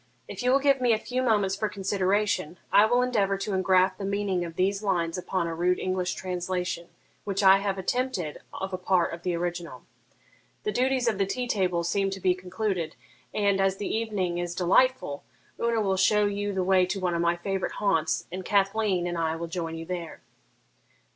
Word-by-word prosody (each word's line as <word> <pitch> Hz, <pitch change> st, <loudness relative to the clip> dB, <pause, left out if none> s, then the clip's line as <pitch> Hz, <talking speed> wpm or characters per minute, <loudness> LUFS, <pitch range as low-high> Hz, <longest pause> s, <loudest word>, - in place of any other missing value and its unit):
If -, -, -6 dB
you 250 Hz, -, +1 dB
will 270 Hz, -, +6 dB
give 275 Hz, -1 st, +2 dB
me 245 Hz, -2 st, +4 dB
a -, -, +2 dB
few 250 Hz, +3 st, -3 dB
moments 205 Hz, -6 st, +2 dB
for 215 Hz, +1 st, -1 dB
consideration, 195 Hz, -3 st, 0 dB
I 210 Hz, -, +6 dB
will 245 Hz, +2 st, +3 dB
endeavour 205 Hz, -6 st, +1 dB
to 195 Hz, +1 st, -3 dB
engraft 185 Hz, 0 st, +3 dB
the -, -, -5 dB
meaning 195 Hz, -2 st, -1 dB
of 165 Hz, -1 st, -7 dB
these 195 Hz, +3 st, +1 dB
lines 175 Hz, -5 st, 0 dB
upon 185 Hz, -1 st, -2 dB
a 165 Hz, -, -3 dB
rude 180 Hz, +2 st, +1 dB
English 185 Hz, -1 st, -1 dB
translation 180 Hz, -1 st, -3 dB, 0.4 s
which 200 Hz, 0 st, -1 dB
I 190 Hz, 0 st, +7 dB
have 195 Hz, -1 st, -2 dB
attempted 190 Hz, -, -2 dB
of 190 Hz, 0 st, -5 dB
a 185 Hz, -, -2 dB
part 180 Hz, -2 st, +1 dB
of 170 Hz, -, -7 dB
the 180 Hz, -1 st, -1 dB
original. 175 Hz, 0 st, -4 dB, 0.8 s
The 425 Hz, -, -1 dB
duties 255 Hz, -3 st, +1 dB
of 215 Hz, -4 st, +1 dB
the 195 Hz, -, +2 dB
tea 250 Hz, +5 st, -2 dB
table 180 Hz, -6 st, 0 dB
seem 195 Hz, +3 st, 0 dB
to 195 Hz, 0 st, -5 dB
be 185 Hz, -1 st, +3 dB
concluded, 185 Hz, -2 st, -3 dB, 0.4 s
and, 200 Hz, -2 st, +1 dB
as 195 Hz, 0 st, +1 dB
the 205 Hz, -, -2 dB
evening 200 Hz, -6 st, -1 dB
is 175 Hz, 0 st, -3 dB
delightful, 185 Hz, -, +2 dB, 0.4 s
Una 235 Hz, -1 st, +1 dB
will 195 Hz, -3 st, +1 dB
show 210 Hz, +2 st, +4 dB
you 205 Hz, 0 st, -1 dB
the 190 Hz, -2 st, -1 dB
way 185 Hz, -1 st, +3 dB
to 195 Hz, +2 st, -2 dB
one 180 Hz, -2 st, 0 dB
of 170 Hz, -, 0 dB
my 170 Hz, 0 st, +2 dB
favourite 195 Hz, +2 st, -2 dB
haunts, 165 Hz, -6 st, +1 dB
and 185 Hz, +1 st, -5 dB
Cathleen 195 Hz, -2 st, +1 dB
and 175 Hz, -1 st, -2 dB
I 160 Hz, -1 st, 0 dB
will 165 Hz, +1 st, -4 dB
join 165 Hz, -1 st, -4 dB
you 165 Hz, 0 st, -6 dB
there.' 175 Hz, -2 st, -6 dB
190 Hz, 200 wpm, -27 LUFS, 175-205 Hz, 0.8 s, I